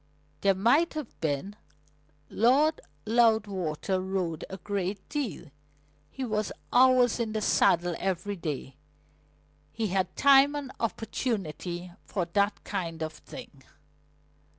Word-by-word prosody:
"There 195 +2 +3
might 280 - +3
have 305 -2 -6
been. 160 +6 -2 0.7
Lord 280 +7 +3 0.2
Loudwater 205 -6 +1
rode 185 -4 -2
a 190 - -6
great 195 +1 -3
deal. 235 - -4 0.6
He 265 - -5
was 215 -2 -1 0.2
hours 250 -1 +5
in 225 -2 -1
the 215 - 0
saddle 175 -3 +3
every 195 +2 -2
day. 145 -6 -5 0.9
He 220 +2 -2
had 185 -1 -1
time 280 +1 +6
and 280 -3 -4
opportunity 190 - -3
for 185 -4 -2
that 200 0 +1
kind 165 -5 -4
of 160 0 -4
thing." 140 -2 -12
200 Hz, 115 wpm, -28 LUFS, 175-235 Hz, 0.9 s, time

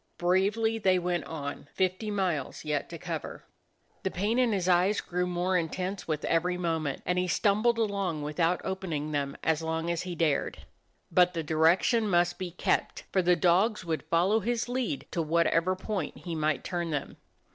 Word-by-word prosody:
Bravely 200 +6 +2
they 190 -3 +3
went 175 -2 -1
on; 145 -3 -6
fifty 185 +3 0
miles 185 -9 -2
yet 150 -2 -1
to - - -7
cover. - - -6 0.6
The - - -1
pain 210 +7 0
in 245 -3 +3
his 190 -3 0
eyes 185 +3 +3
grew 180 0 -2
more 180 +1 0
intense 180 +3 -2
with 155 -2 -2
every 180 +2 +1
moment, 160 -5 -2
and 180 +1 +1
he 180 - 0
stumbled 215 +6 +2
along 200 -8 -1
without 165 +4 0
opening 170 -6 -3
them 140 -2 -2
as 160 -1 +1
long 160 +1 -1
as 170 - -1
he 180 -1 -5
dared. 155 -4 0 0.5
But 180 0 +4
the 165 - -1
direction 170 +9 +3
must 175 0 +2
be 185 -1 -3
kept, 175 - -1
for 190 - +3
the 180 0 +4
dogs 185 +4 +2
would 160 -2 -1
follow 185 +6 +2
his 235 +3 -1
lead 245 - -2
to 170 - -1
whatever 170 +3 +2
point 190 -4 -4
he 175 - -6
might 155 -2 0
turn 175 -2 -2
them. 145 -3 -3
180 Hz, 180 wpm, -29 LUFS, 165-190 Hz, 0.6 s, But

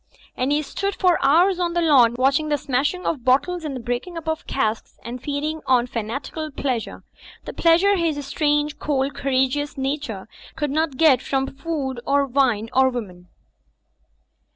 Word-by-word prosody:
And 255 +3 -1
he 300 +1 +1
stood 395 +7 -3
for 360 -5 +2
hours 345 +7 +4
on 345 -1 0
the 345 - +1
lawn, 250 -7 +5
watching 275 +4 +2
the 295 - +2
smashing 290 +7 -1
of 285 -7 -2
bottles 305 +8 +2
and 295 -3 -4
the - - -4
breaking 245 +9 -4
up 325 -1 -8
of 320 +2 -3
casks 220 -4 -2
and 245 +1 -7
feeding 300 +2 -3
on 250 -2 +4
fanatical 250 +7 -5
pleasure: 260 -5 -3 0.4
the - - -6
pleasure 350 +5 +4
his 315 -5 -1
strange, 295 +1 0
cold, 275 -1 -1
courageous 275 +2 0
nature 270 -7 -3 0.3
could 295 -3 -2
not 310 -2 -1
get 275 -5 +5
from 270 0 -2
food 275 -4 -3
or 280 0 +2
wme 240 -5 +1
or 260 0 +4
woman. 185 -8 -7
280 Hz, 165 wpm, -22 LUFS, 255-315 Hz, 0.4 s, lawn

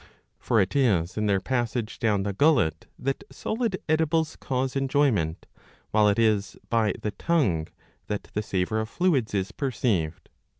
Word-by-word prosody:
''' - - -45
For 115 - +2
it 95 +3 +1
is 100 -11 +2
in 105 0 0
their 100 -1 +3
passage 120 0 -2
down 105 -3 +1
the 100 0 -2
gullet 110 - +2
that 135 +8 -2
solid 225 -4 -2
edibles 160 0 +1
cause 130 0 -2
enjoyment, 130 - +1 0.5
while 105 -1 +4
it 100 - +1
is 105 -3 +1
by 110 -3 +2
the 105 - -1
tongue 100 - +1 0.4
that 105 - -3
the 105 - 0
savour 100 +1 -1
of 110 0 -3
fluids 140 - +1
is 95 -1 -1
perceived. 105 - -1
110 Hz, 160 wpm, -26 LUFS, 100-135 Hz, 0.5 s, while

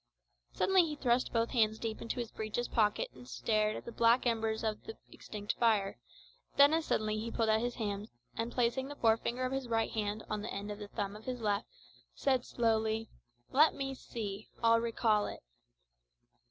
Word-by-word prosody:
Suddenly 385 -1 +4
he 300 - -4
thrust 250 -3 +1
both 230 0 +1
hands 220 -3 +3
deep 220 -1 -4
into 230 - -3
his 235 -2 -4
breeches 220 +3 -3
pockets 210 -2 +1
and 125 -1 -13
stared 215 - +1
at - - -7
the 235 - -6
black 235 +2 +4
embers 225 -2 0
of 215 -1 -2
the 445 - -7
extinct 210 -1 -5
fire; 215 -4 +2 0.6
then 285 +2 +8
as 325 0 +1
suddenly 215 0 0
he 225 +2 -3
pulled 225 -1 0
out 220 0 +4
his 240 +1 -2
hands, 210 -2 -3 0.3
and 230 +1 -2
placing 250 +2 +1
the 290 - -7
forefinger 235 +1 +1
of 255 - -2
his 270 -2 -2
right 225 -1 +1
hand 210 0 -2
on 210 -1 -2
the 215 - -5
end 200 +1 -4
of 205 - -6
the 205 - -6
thumb 205 -1 -3
of 215 - -11
his 255 -1 -3
left, 205 -3 0 0.5
said 260 -3 +1
slowly 225 -2 0 0.4
"Let 305 +4 +5
me 270 -1 -3
see 215 -5 -6
I'll 230 0 +6
recall 225 -2 +2
it." - - -8
225 Hz, 195 wpm, -33 LUFS, 215-240 Hz, 0.6 s, then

